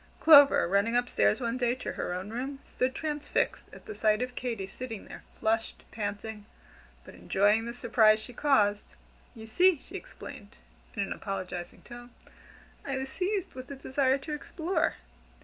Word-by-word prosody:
Clover, 285 - +7
running 200 +6 +2
up 245 0 +1
stairs 105 - +2
one 235 +2 -2
day 245 -1 +1
to 255 - -5
her - - -4
own 185 +4 -4
room, 265 +4 -4
stood 255 +1 -1
transfixed 300 -2 -2
at - - -14
the 420 - -6
sight 215 - +2
of 250 0 -5
Katy 235 -6 -3
sitting 225 +2 -7
there, - - -10 0.2
flushed, 225 +1 -1
panting, 210 0 -5 0.6
but - - -12
enjoying 210 +4 +2
the 235 - -4
surprise 225 -3 +4
she 215 +3 -7
caused. 210 -7 +1 0.4
"You 220 -1 -9
see," 355 +10 +4
she - - -17
explained, - - -10 0.4
in - - 0
an - - -3
apologizing 185 -3 -6
tone, 240 0 -11 0.7
"I 270 -1 -3
was 265 0 -4
seized 385 +5 -2
with 255 0 -9
a 280 - -6
desire 265 0 +1
to 300 +3 -6
explore. 325 +3 -1
240 Hz, 165 wpm, -29 LUFS, 215-275 Hz, 0.7 s, Clover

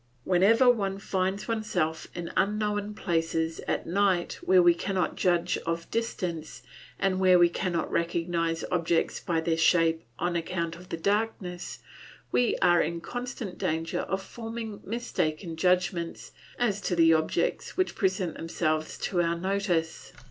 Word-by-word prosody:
Whenever 200 +8 +4
one 200 -5 +3
finds 190 0 -2
oneself 215 -8 -1
in 175 -1 -5
unknown 210 0 0
places 165 -2 -1
at - - -1
night 185 -1 +1
where 185 0 +5
we 175 0 +7
cannot 185 +1 -1
judge 175 -2 +1
of 165 0 -3
distance, 175 -8 -3 0.3
and 190 -1 +1
where 185 -1 +6
we 175 0 +6
cannot 175 0 -2
recognise 170 -1 0
objects 170 -2 +1
by 165 -2 -1
their 160 0 0
shape 165 0 +3 0.2
on 175 0 -1
account 170 0 -2
of 180 +1 -13
the - - -3
darkness, 200 -2 -2 0.5
we 245 - +2
are 175 -1 +5
in 170 +2 -2
constant 245 -1 -6
danger 160 +1 -1
of 190 0 -2
forming 225 -1 -6
mistaken 175 -7 -2
judgments 180 0 0 0.3
as 205 -5 0
to 180 - -1
the 165 -1 +6
objects 160 0 0
which 370 - +1
present 190 -3 0
themselves 155 -1 -1
to 175 -2 0
our 170 0 0
notice. 180 -3 -1
180 Hz, 140 wpm, -28 LUFS, 165-200 Hz, 0.5 s, we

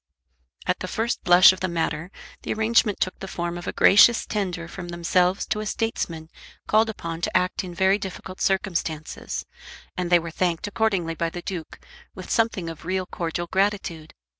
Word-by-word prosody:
At - - 0
the - - -4
first 230 +2 -2
blush 180 +1 +8
of 185 - -8
the 185 - -1
matter 170 0 -2 0.3
the - - -4
arrangement 220 -1 +2
took 185 - -1
the 195 - -6
form 175 -2 -3
of 175 - -7
a - - 0
gracious 225 +4 +6
tender 185 -5 -3
from 175 0 -8
themselves 180 +2 +1
to 215 - 0
a 215 - -4
statesman 165 -9 -3 0.3
called 220 +1 +3
upon 170 -6 -5
to - - +2
act 180 +1 -1
in 180 -2 -8
very 190 +3 +3
difficult 190 -1 -7
circumstances, 170 -5 -2 0.5
and 180 -1 -2
they 175 - +8
were 170 -1 -5
thanked 170 -1 -1
accordingly 200 -5 0
by 165 0 -1
the 175 +1 -8
Duke, 175 -5 -6 0.4
with 185 - -8
something 225 -6 +1
of 165 -2 -7
real 185 +2 -1
cordial 175 -1 -3
gratitude. 190 -4 -1
180 Hz, 180 wpm, -24 LUFS, 170-195 Hz, 0.5 s, blush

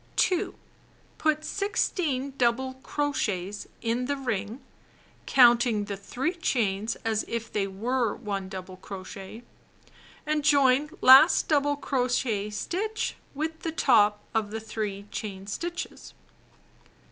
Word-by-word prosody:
2. 365 -3 +1 0.6
Put 310 0 +1
16 320 -9 -1
dou 240 -3 +4
ble 260 +2 -6
crochets 210 -11 -2 0.2
in 235 +2 0
the 285 +1 -1
ring 225 -3 -3 0.7
(counting 240 -4 +5
the 200 -1 -4
3 245 - -3
chains 220 - 0
as 220 -1 +1
if 230 0 -4
they 200 -2 0
were 230 +4 -1
one 200 -5 -4
double 185 -1 -8
cro 190 0 -8
chet) 195 +4 -9 0.8
and 305 -1 0
join 280 0 +4
last 265 +6 +8
double 290 -1 +2
crochet 245 -6 -1
stitch 405 - -3 0.2
with 320 +2 -3
the 325 - -3
top 210 -9 +3
of 220 -2 0
the 220 +1 -4
3 210 -2 -4
chain 195 -3 -5
stitches. 340 - -6
235 Hz, 125 wpm, -27 LUFS, 205-285 Hz, 0.8 s, last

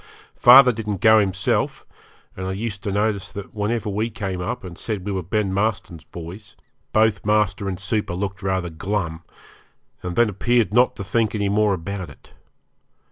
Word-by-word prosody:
Father 125 +1 +8
didn't 105 -4 -4
go 110 +2 +6
himself, 95 -2 -1 0.5
and 95 0 -5
I 95 - -2
used 100 0 -4
to 100 - -3
notice 105 -1 -1
that 100 -1 -8
whenever 110 +1 -2
we 105 +3 -1
came 95 -5 -4
up 115 +4 -4
and 90 -2 -8
said 100 0 -5
we 105 - -2
were 95 -1 -2
Ben 95 +2 -1
Marston's 95 -5 -2
boys 90 +5 -10 0.4
both 110 -2 +2
master 105 -1 +1
and 95 -1 -4
super 100 -1 -2
looked 95 +1 -4
rather 95 -3 -1
glum, 85 -1 -3 0.8
and 90 -1 -5
then 120 0 +4
appeared 110 0 +1
not 125 +2 +4
to - - -6
think 110 +3 0
any 100 -1 0
more 105 -1 +2
about 95 0 -6
it. 70 - -17
100 Hz, 175 wpm, -22 LUFS, 95-110 Hz, 0.8 s, Father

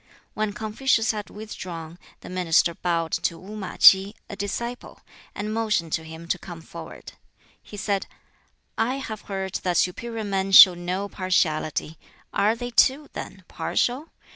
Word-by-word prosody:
When 215 -1 -1
Confucius 220 +2 +1
had 210 -2 -6
withdrawn, 175 -6 -8 0.2
the - - -10
minister 175 -2 +2
bowed 170 -2 -1
to 170 - -1
Wu 200 +5 -10
ma 195 -4 -6
K'i, 195 +2 +7 0.2
a - - -5
disciple, 235 +5 -5 0.3
and 210 +1 -3
motioned 210 -8 0
to 160 - -1
him 160 +1 -10
to - - 0
come 175 -3 -9
forward. - - -10 0.5
He 205 - -11
said, 200 0 -1 0.7
"I 250 +3 +1
have 225 -6 -6
heard 190 -1 -3
that 180 -2 0
superior 225 +5 -1
men 195 -1 -2
show 190 -1 +11
no 180 +3 -3
partiality; 160 -5 -1 0.3
are 215 +3 +2
they, 245 +1 -6
too, 275 +5 +3
then, 190 -1 -8
partial? 265 +6 -1
195 Hz, 150 wpm, -24 LUFS, 175-220 Hz, 0.7 s, show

